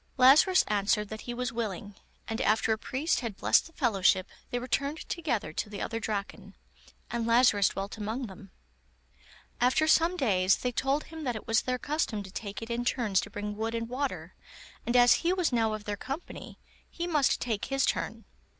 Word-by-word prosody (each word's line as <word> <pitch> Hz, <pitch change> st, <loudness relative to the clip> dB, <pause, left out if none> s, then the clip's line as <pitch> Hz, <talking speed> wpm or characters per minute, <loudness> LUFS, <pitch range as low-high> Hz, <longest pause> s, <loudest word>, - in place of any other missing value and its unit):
Lazarus 290 Hz, +9 st, +6 dB
answered 210 Hz, 0 st, +1 dB
that 220 Hz, 0 st, -7 dB
he -, -, -2 dB
was 250 Hz, +1 st, -3 dB
willing, 205 Hz, -3 st, -4 dB, 0.3 s
and 225 Hz, -, -3 dB
after 220 Hz, +1 st, +2 dB
a -, -, -2 dB
priest 285 Hz, +8 st, -1 dB
had 230 Hz, -5 st, -5 dB
blessed -, -, +3 dB
the 330 Hz, -, -19 dB
fellowship, 195 Hz, -, +2 dB, 0.2 s
they 245 Hz, -, -2 dB
returned 280 Hz, +5 st, -2 dB
together 240 Hz, -, -2 dB
to 205 Hz, -, -3 dB
the 205 Hz, -1 st, -7 dB
other 225 Hz, -, -3 dB
Draken, 200 Hz, -2 st, -5 dB, 0.6 s
and 235 Hz, -1 st, -2 dB
Lazarus 230 Hz, -4 st, +5 dB
dwelt 195 Hz, +3 st, -6 dB
among 220 Hz, +5 st, -3 dB
them. 195 Hz, -1 st, -11 dB, 1.1 s
After 255 Hz, +6 st, +3 dB
some 335 Hz, +3 st, +4 dB
days 190 Hz, -, +3 dB
they 250 Hz, -, -2 dB
told 270 Hz, +5 st, 0 dB
him 320 Hz, -1 st, -9 dB
that 245 Hz, -4 st, -1 dB
it 215 Hz, -, -7 dB
was 225 Hz, 0 st, +2 dB
their 255 Hz, 0 st, -1 dB
custom 255 Hz, -7 st, -2 dB
to 190 Hz, -, -11 dB
take 205 Hz, +1 st, -6 dB
it 225 Hz, -, -7 dB
in 235 Hz, +1 st, -1 dB
turns 230 Hz, -6 st, +1 dB
to -, -, -7 dB
bring 205 Hz, 0 st, -5 dB
wood 225 Hz, +2 st, -2 dB
and 230 Hz, 0 st, -3 dB
water, 265 Hz, +3 st, -4 dB, 0.5 s
and 240 Hz, -, 0 dB
as 245 Hz, 0 st, +7 dB
he 350 Hz, +2 st, +2 dB
was 360 Hz, -7 st, 0 dB
now 225 Hz, -2 st, +2 dB
of 215 Hz, -1 st, -5 dB
their 205 Hz, -1 st, -4 dB
company, 275 Hz, -, -7 dB, 0.3 s
he 340 Hz, -, -4 dB
must 300 Hz, -6 st, +2 dB
take 220 Hz, -4 st, -2 dB
his 270 Hz, 0 st, +1 dB
turn. -, -, -2 dB
235 Hz, 195 wpm, -29 LUFS, 210-270 Hz, 1.1 s, as